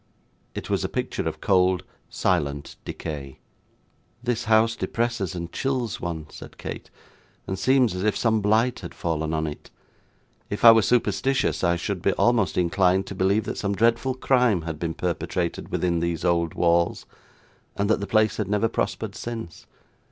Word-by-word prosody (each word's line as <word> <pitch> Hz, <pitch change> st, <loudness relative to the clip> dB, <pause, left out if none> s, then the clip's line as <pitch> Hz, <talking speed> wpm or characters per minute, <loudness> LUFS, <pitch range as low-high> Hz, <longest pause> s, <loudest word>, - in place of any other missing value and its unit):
It -, -, -5 dB
was -, -, 0 dB
a -, -, -1 dB
picture -, -, -3 dB
of -, -, -10 dB
cold, 95 Hz, -2 st, +3 dB, 0.3 s
silent 70 Hz, -1 st, -1 dB
decay. 70 Hz, -4 st, -6 dB, 0.9 s
'This 120 Hz, -1 st, -1 dB
house 110 Hz, +1 st, +4 dB
depresses 115 Hz, -7 st, -2 dB
and 85 Hz, -1 st, -5 dB
chills 130 Hz, -5 st, -2 dB
one,' 80 Hz, -3 st, -4 dB
said -, -, -11 dB
Kate, -, -, -7 dB, 0.6 s
'and 95 Hz, 0 st, -4 dB
seems 130 Hz, -4 st, +3 dB
as 90 Hz, +1 st, -3 dB
if 105 Hz, -1 st, +1 dB
some 110 Hz, -2 st, +2 dB
blight 110 Hz, +4 st, +2 dB
had -, -, -9 dB
fallen 80 Hz, -2 st, -2 dB
on 80 Hz, 0 st, 0 dB
it. 75 Hz, -1 st, -7 dB, 0.8 s
If 105 Hz, -, -1 dB
I 115 Hz, -, +12 dB
were 115 Hz, 0 st, +5 dB
superstitious, 125 Hz, +3 st, +1 dB
I 85 Hz, 0 st, +3 dB
should 90 Hz, +1 st, -3 dB
be 100 Hz, -, +2 dB
almost 120 Hz, -5 st, +2 dB
inclined 90 Hz, +1 st, +2 dB
to -, -, -7 dB
believe 100 Hz, +3 st, +2 dB
that -, -, -5 dB
some 100 Hz, 0 st, -1 dB
dreadful 115 Hz, +4 st, +2 dB
crime 125 Hz, -8 st, +2 dB
had 80 Hz, -2 st, -5 dB
been 80 Hz, 0 st, -3 dB
perpetrated 85 Hz, 0 st, -2 dB
within 85 Hz, -2 st, 0 dB
these 85 Hz, -1 st, -2 dB
old 85 Hz, -2 st, +1 dB
walls, 85 Hz, 0 st, +2 dB, 0.7 s
and 100 Hz, -, +1 dB
that 110 Hz, -, +2 dB
the 100 Hz, -, -4 dB
place 110 Hz, -2 st, +2 dB
had 105 Hz, -, -1 dB
never 105 Hz, +2 st, +1 dB
prospered 110 Hz, -2 st, -2 dB
since. 115 Hz, -9 st, -7 dB
100 Hz, 165 wpm, -25 LUFS, 85-115 Hz, 0.9 s, I